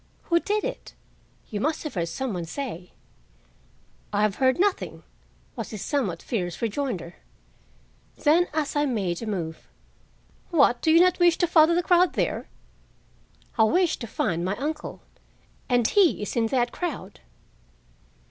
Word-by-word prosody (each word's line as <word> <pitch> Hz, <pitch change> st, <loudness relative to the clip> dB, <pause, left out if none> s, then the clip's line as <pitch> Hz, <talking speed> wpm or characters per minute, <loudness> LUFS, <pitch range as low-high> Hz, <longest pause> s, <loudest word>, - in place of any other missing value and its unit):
"Who 340 Hz, -1 st, +2 dB
did 420 Hz, +3 st, -1 dB
it? -, -, -6 dB, 0.6 s
You 210 Hz, -, -2 dB
must 310 Hz, +8 st, -1 dB
have 305 Hz, -, -5 dB
heard 170 Hz, -3 st, -1 dB
some 260 Hz, +6 st, -3 dB
one 175 Hz, -2 st, -4 dB
say." 180 Hz, -, -6 dB, 1.2 s
"I 205 Hz, 0 st, +1 dB
have 210 Hz, -2 st, +1 dB
heard 260 Hz, +1 st, +2 dB
nothing," 400 Hz, 0 st, 0 dB, 0.5 s
was 225 Hz, -4 st, -5 dB
his 215 Hz, -3 st, -6 dB
somewhat 205 Hz, -, -2 dB
fierce 180 Hz, -7 st, -3 dB
rejoinder. 220 Hz, -, -3 dB, 1.0 s
Then, 330 Hz, +4 st, +3 dB
as 300 Hz, -1 st, -2 dB
I 290 Hz, 0 st, +2 dB
made 195 Hz, -9 st, -2 dB
a 230 Hz, -, -5 dB
move, 165 Hz, -6 st, -4 dB, 0.8 s
"What 275 Hz, -8 st, +3 dB
you 320 Hz, +1 st, +6 dB
do 345 Hz, -, +8 dB
not 365 Hz, 0 st, +2 dB
wish 345 Hz, -1 st, +5 dB
to 350 Hz, -, +3 dB
follow 335 Hz, -1 st, +5 dB
the 350 Hz, -, +1 dB
crowd 355 Hz, 0 st, +4 dB
there?" -, -, -2 dB, 1.1 s
"I -, -, +7 dB
wish 345 Hz, +6 st, +2 dB
to 235 Hz, -, -7 dB
find 175 Hz, -6 st, -1 dB
my 190 Hz, +3 st, -1 dB
uncle, 300 Hz, +3 st, -4 dB, 0.7 s
and 245 Hz, -2 st, +3 dB
he 375 Hz, -, +3 dB
is 205 Hz, -, -5 dB
in 230 Hz, -2 st, +2 dB
that 240 Hz, 0 st, +1 dB
crowd." 295 Hz, -, -5 dB
260 Hz, 155 wpm, -25 LUFS, 205-330 Hz, 1.2 s, do